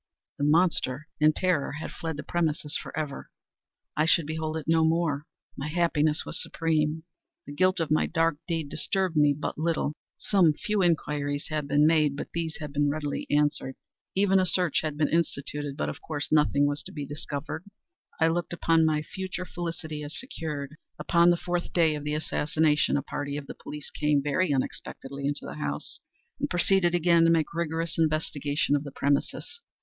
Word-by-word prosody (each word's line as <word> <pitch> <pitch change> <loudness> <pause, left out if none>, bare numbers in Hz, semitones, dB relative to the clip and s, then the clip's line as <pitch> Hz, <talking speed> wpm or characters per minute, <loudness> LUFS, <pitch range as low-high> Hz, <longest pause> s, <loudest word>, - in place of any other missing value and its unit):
The - - -1
monster, 155 -3 +2
in 155 0 +6
terror, 180 -7 0
had 155 +2 -5
fled 160 -2 -5
the 150 - -5
premises 155 -3 -1
forever! 150 -3 -4 0.7
I 155 - +2
should 165 -1 +4
behold 155 +1 -3
it 155 - -6
no 160 0 +4
more! 160 -3 +1 0.3
My 140 - -4
happiness 155 -2 +1
was - - 0
supreme! 160 -1 0 0.4
The 145 - -8
guilt 185 +4 +2
of 160 -2 -1
my 155 - +3
dark 165 -2 +1
deed 165 -4 -1
disturbed 190 0 0
me 150 -1 +5
but 150 - -4
little. 160 -2 0 0.2
Some 180 -6 +3
few 210 +4 -1
inquiries 145 -4 0
had 155 -2 -2
been 145 +1 +4
made, 155 -3 +4
but - - -5
these 165 -1 -3
had 150 -3 -7
been 145 0 +2
readily 145 -1 -3
answered. 145 -2 +1 0.4
Even 195 0 +4
a 185 - +3
search 175 -1 +2
had 155 -2 -3
been 150 -1 +3
instituted—but 145 - -1
of 75 - -5
course 150 -2 -3
nothing 150 -2 +4
was 145 +1 -1
to - - -10
be 145 -2 -5
discovered. 145 +2 -5 0.6
I 160 - +5
looked 175 +1 -1
upon 165 -1 +3
my 155 -1 +1
future 185 +1 -5
felicity 165 -4 -5
as 145 +1 -5
secured. 150 - -5 0.2
Upon 170 -1 +4
the 175 - +4
fourth 175 0 -2
day 165 -3 +4
of 150 -1 -4
the 150 0 -1
assassination, 155 0 +1
a 140 - -2
party 145 -1 -4
of 145 - -6
the - - -7
police 150 -1 -8
came, 150 -2 +1
very 150 +4 +1
unexpectedly, 140 +1 -3
into 145 0 -3
the - - -7
house, 70 +1 -4 0.4
and - - -1
proceeded 175 0 +3
again 170 -1 +4
to - - +5
make 165 -2 +2
rigorous 165 0 -2
investigation 150 -2 +1
of 145 - -1
the 140 - -7
premises. 140 - -1
155 Hz, 180 wpm, -27 LUFS, 145-165 Hz, 0.7 s, in